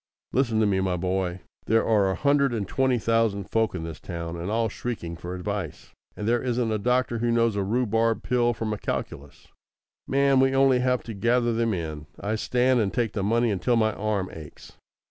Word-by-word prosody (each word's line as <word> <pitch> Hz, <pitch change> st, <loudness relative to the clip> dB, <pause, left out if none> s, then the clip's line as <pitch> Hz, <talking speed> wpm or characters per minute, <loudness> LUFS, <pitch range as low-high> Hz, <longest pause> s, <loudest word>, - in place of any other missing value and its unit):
Listen 120 Hz, -4 st, +2 dB
to 110 Hz, -, +3 dB
me, 100 Hz, -2 st, +1 dB
my 95 Hz, -2 st, 0 dB
boy! 90 Hz, 0 st, -2 dB, 0.3 s
There 115 Hz, +1 st, +3 dB
are 105 Hz, -4 st, +3 dB
a 95 Hz, -, 0 dB
hundred 140 Hz, -3 st, +2 dB
and 100 Hz, -4 st, -3 dB
twenty 130 Hz, +1 st, +1 dB
thousand 115 Hz, -3 st, 0 dB
folk 110 Hz, -3 st, +1 dB
in 80 Hz, -, -4 dB
this 80 Hz, -2 st, -7 dB
town, 85 Hz, -1 st, -6 dB
all 115 Hz, +1 st, +1 dB
shrieking 105 Hz, -6 st, -5 dB
for 85 Hz, +1 st, -6 dB
advice, 90 Hz, -1 st, -5 dB, 0.3 s
and 105 Hz, -, -3 dB
there 120 Hz, +1 st, +2 dB
isn't 120 Hz, -2 st, -1 dB
a 110 Hz, -, 0 dB
doctor 125 Hz, +1 st, +1 dB
who 120 Hz, +1 st, 0 dB
knows 115 Hz, -2 st, +2 dB
a 100 Hz, -, 0 dB
rhubarb 115 Hz, +1 st, +1 dB
pill 120 Hz, -1 st, +2 dB
from 110 Hz, -1 st, -2 dB
a 105 Hz, -, -5 dB
calculus. 70 Hz, 0 st, -5 dB, 0.6 s
Man, 140 Hz, 0 st, +3 dB
we 135 Hz, 0 st, +3 dB
only 135 Hz, -1 st, +4 dB
have 125 Hz, 0 st, +1 dB
to 115 Hz, -, -7 dB
gather 120 Hz, +3 st, +1 dB
them 115 Hz, -2 st, 0 dB
in. 80 Hz, -3 st, -5 dB
I 105 Hz, +2 st, -2 dB
stand 125 Hz, +3 st, +2 dB
and 100 Hz, -4 st, +1 dB
take 120 Hz, -4 st, 0 dB
the 100 Hz, -, -2 dB
money 115 Hz, +3 st, +2 dB
until 110 Hz, +5 st, +1 dB
my 110 Hz, -2 st, +2 dB
arm 105 Hz, -3 st, -2 dB
aches." 80 Hz, -2 st, -11 dB
115 Hz, 205 wpm, -25 LUFS, 95-120 Hz, 0.6 s, only